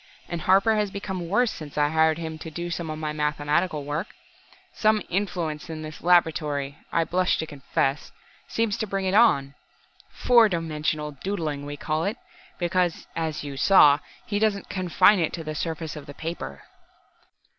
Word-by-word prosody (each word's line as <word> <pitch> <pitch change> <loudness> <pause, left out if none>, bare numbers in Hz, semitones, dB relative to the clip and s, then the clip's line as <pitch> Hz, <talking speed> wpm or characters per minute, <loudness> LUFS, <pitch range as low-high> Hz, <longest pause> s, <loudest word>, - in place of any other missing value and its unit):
And 170 -1 -4
Harper 195 +6 +4
has 210 -1 +1
become 190 -3 -5
worse 225 +4 +2
since 150 -3 -9
I 145 0 +3
hired 160 0 +3
him 160 -1 -5
to 160 - -7
do 170 +2 -5
some 170 -1 -3
of 155 - -4
my 155 -1 -3
mathematical 150 +2 0
work. 150 +6 -4 0.6
Some 215 -1 +2
influence 175 -4 -2
in 155 -1 -6
this 155 0 -8
laboratory 150 -5 +2
I 165 - +2
blush 180 +2 +1
to 160 - -2
confess 140 -1 -2 0.4
seems 225 -3 0
to 220 - -2
bring 195 -1 -2
it 185 - 0
on. 140 -12 +4 0.6
'Four 235 -3 +4
dimensional 155 -3 -2
doodling' 150 -2 -4
we 145 0 -6
call 155 +2 -1
it, 210 +5 -2 0.4
because, 175 -1 0
as 160 -2 -2
you 140 -2 -6
saw, 145 -2 +6 0.3
he 205 -1 -1
doesn't 210 -2 0
confine 185 +2 +4
it 160 - 0
to 165 - -5
the 155 0 -4
surface 160 0 -4
of 150 - -9
the 145 - -9
paper!" 160 - -6
165 Hz, 170 wpm, -25 LUFS, 150-190 Hz, 0.6 s, saw